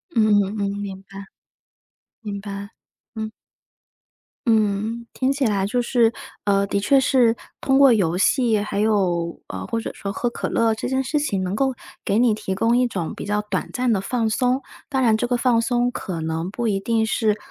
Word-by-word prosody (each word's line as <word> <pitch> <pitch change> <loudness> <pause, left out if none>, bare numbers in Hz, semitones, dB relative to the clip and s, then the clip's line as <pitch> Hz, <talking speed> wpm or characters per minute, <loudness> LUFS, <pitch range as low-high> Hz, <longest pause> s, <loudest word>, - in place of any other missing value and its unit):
嗯 225 -2 +4 0.2
嗯 200 +2 -3
嗯， 200 -1 0
明 195 -2 -6
白， 195 +1 -10 1.0
明 205 -3 -5
白， 200 0 -6 0.5
嗯。 220 -1 -4 1.2
嗯， 220 +1 +1
听 260 - 0
起 275 -1 0
来 200 -4 +1
就 245 +5 0
是， 235 -1 +2 0.3
呃， 200 -1 +3
的 200 - 0
确 275 +7 +3
是， 250 -4 +3 0.2
通 270 0 +2
过 275 -1 +7
游 180 -7 +2
戏 230 +3 +3
还 205 -1 -3
有， 185 -6 +1
呃， - - -6
或 230 - -2
者 - - -5
说 200 - -6
喝 240 - -1
可 - - -4
乐 230 -1 +2
这 220 - -4
件 265 +1 0
事 300 +3 0
情 205 -11 -1
能 185 +1 -2
够 265 +5 +1 0.3
给 200 - +1
你 235 -1 +4
提 190 -2 -3
供 230 +5 +2
一 250 0 +3
种 180 -8 -4
比 - - -7
较 205 +1 0
短 210 - -3
暂 250 -1 +1
的 210 - +2
放 225 +3 -1
松， 250 +4 +1 0.3
当 265 -3 0
然 225 -3 +4
这 245 - -1
个 245 - +1
放 240 -1 +3
松 245 +1 +1
可 180 -8 -5
能 160 +2 -2
不 235 +4 -4
一 195 -2 0
定 225 +2 +1
是 215 -1 +1
220 Hz, 215 characters per minute, -22 LUFS, 200-245 Hz, 1.2 s, 过